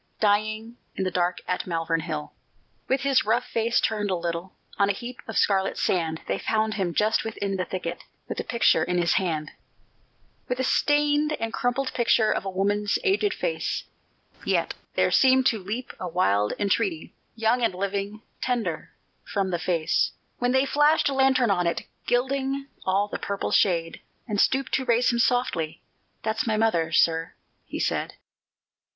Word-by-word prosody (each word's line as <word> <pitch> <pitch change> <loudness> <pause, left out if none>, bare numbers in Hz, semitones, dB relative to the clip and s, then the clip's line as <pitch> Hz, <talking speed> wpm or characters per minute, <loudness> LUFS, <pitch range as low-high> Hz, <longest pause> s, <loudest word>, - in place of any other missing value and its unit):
Dying 215 +2 0 0.2
in 190 - -1
the 185 - -1
dark 175 0 0
at 180 - -2
Malvern 165 -1 0
Hill. 155 -2 -5 0.5
With 265 +1 +1
his 275 -1 +3
rough 220 +3 +1
face 230 +1 +1
turned 210 -2 0
a 185 - +1
little, 170 +1 -4 0.3
On 200 0 +4
a - - +3
heap 240 +4 -8
of 225 - -4
scarlet 195 -1 +2
sand, 160 -3 0
They - - -1
found 220 -1 0
him, 190 -4 -1
just 215 +1 +2
within 200 -3 -3
the 185 -1 -1
thicket, 175 -1 -5 0.2
With - - -4
a - - -1
picture 230 -9 +3
in 180 +1 -1
his 170 -1 +2
hand, 155 -4 -2 1.0
With 250 0 -2
a - - +1
stained 295 +2 +2
and 225 -4 -3
crumpled 245 +2 -1
picture 230 -2 +3
Of - - -1
a - - -1
woman's 205 +2 0
aged 405 0 +2
face; - - -2 0.6
Yet - - 0 0.2
there - - +2
seemed 260 -1 +5
to 225 -4 +3
leap 220 +7 -5
a 180 - -4
wild 105 - +1
entreaty, 200 -4 -1 0.2
Young 225 +2 +2
and 225 -6 +1
living 200 +3 -3 0.2
tender 245 -3 -2 0.3
from 195 -2 -2
the 175 - -1
face 165 -3 +1 0.3
When 245 0 +1
they 265 +1 +3
flashed 295 +2 +3
a - - -2
lantern 265 -4 +3
on 180 -3 +1
it, 170 - -1 0.2
Gilding 270 +2 0 0.2
all 195 +2 +2
the - - -5
purple 200 -1 -3
shade, 165 -3 +2 0.3
And 210 -3 +1
stooped 265 0 +1
to 265 - 0
raise 240 0 +3
him 235 - -1
softly, 180 -11 0 0.4
"That's 220 +2 -1
my 215 -1 +1
mother, 175 -8 +1
sir," 165 +1 +2 0.3
he - - -5
said. - - -1
210 Hz, 170 wpm, -25 LUFS, 180-245 Hz, 1.0 s, seemed